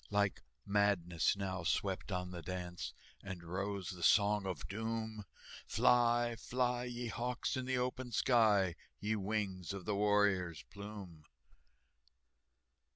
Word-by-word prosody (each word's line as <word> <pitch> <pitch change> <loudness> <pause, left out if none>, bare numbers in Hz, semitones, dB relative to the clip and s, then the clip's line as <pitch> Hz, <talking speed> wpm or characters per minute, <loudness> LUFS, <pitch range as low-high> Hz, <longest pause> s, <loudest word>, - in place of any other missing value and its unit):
Like 100 -2 +1 0.2
madness 100 -3 +2
now 95 -3 -3
swept 95 +3 0
on 90 -1 -2
the 85 -1 -6
dance, 90 0 -5 0.3
And 95 -3 -7
rose 95 +1 -3
the 90 -2 -9
Song 100 +3 +4
of 95 - -4
Doom, 110 0 -3 0.4
"Fly, 120 -1 +4
fly, 125 +1 0
ye 120 0 -4
hawks, 125 +5 -2
in 130 -1 -2
the 130 0 0
open 125 0 -2
sky, 105 -7 +4 0.2
Ye 110 +1 0
wings 100 -3 -2
of 100 -2 -6
the 105 - 0
warrior's 100 -5 +2
plume!" 100 -6 -9
100 Hz, 125 wpm, -36 LUFS, 95-115 Hz, 0.4 s, Song